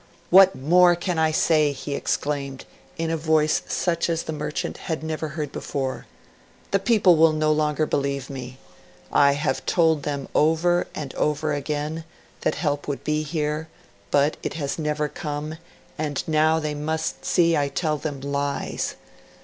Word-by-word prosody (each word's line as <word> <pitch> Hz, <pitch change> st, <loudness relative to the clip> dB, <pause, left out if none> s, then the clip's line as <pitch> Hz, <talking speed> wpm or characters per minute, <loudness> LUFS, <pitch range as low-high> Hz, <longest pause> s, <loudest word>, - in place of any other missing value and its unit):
'What 190 Hz, +1 st, +8 dB
more 175 Hz, +5 st, +5 dB
can 175 Hz, -1 st, -2 dB
I 160 Hz, 0 st, +3 dB
say?' 155 Hz, -1 st, +3 dB
he 140 Hz, +1 st, -5 dB
exclaimed, 140 Hz, -2 st, -2 dB, 0.3 s
in 165 Hz, -1 st, -1 dB
a 165 Hz, -, 0 dB
voice 155 Hz, -1 st, +2 dB
such 170 Hz, -1 st, 0 dB
as 165 Hz, -1 st, 0 dB
the 160 Hz, -, -4 dB
merchant 150 Hz, 0 st, -3 dB
had 160 Hz, -1 st, -2 dB
never 160 Hz, 0 st, -3 dB
heard 150 Hz, -2 st, -4 dB
before. 135 Hz, -2 st, -4 dB, 0.6 s
'The 195 Hz, -, +3 dB
people 195 Hz, -6 st, +4 dB
will 160 Hz, 0 st, +5 dB
no 155 Hz, 0 st, +2 dB
longer 155 Hz, 0 st, +1 dB
believe 140 Hz, -2 st, -1 dB
me. 130 Hz, -2 st, -7 dB, 0.5 s
I 140 Hz, 0 st, +5 dB
have 145 Hz, +1 st, -1 dB
told 160 Hz, -3 st, +3 dB
them 140 Hz, -2 st, -3 dB
over 165 Hz, +3 st, +3 dB
and 140 Hz, -3 st, -5 dB
over 150 Hz, 0 st, 0 dB
again 150 Hz, +2 st, -3 dB, 0.4 s
that -, -, 0 dB
help 145 Hz, -3 st, -2 dB
would 145 Hz, -2 st, -3 dB
be 150 Hz, 0 st, 0 dB
here, 155 Hz, 0 st, -2 dB, 0.4 s
but 145 Hz, +2 st, +2 dB
it -, -, -4 dB
has 145 Hz, -1 st, -3 dB
never 150 Hz, -1 st, -1 dB
come, 150 Hz, +1 st, -5 dB, 0.4 s
and 150 Hz, -3 st, -2 dB
now 155 Hz, 0 st, +3 dB
they 155 Hz, -1 st, -2 dB
must 160 Hz, +2 st, -3 dB
see 170 Hz, -1 st, +3 dB
I 145 Hz, -2 st, +1 dB
tell 155 Hz, +1 st, -1 dB
them 145 Hz, -3 st, -4 dB
lies. 140 Hz, 0 st, -2 dB
155 Hz, 160 wpm, -24 LUFS, 145-160 Hz, 0.6 s, What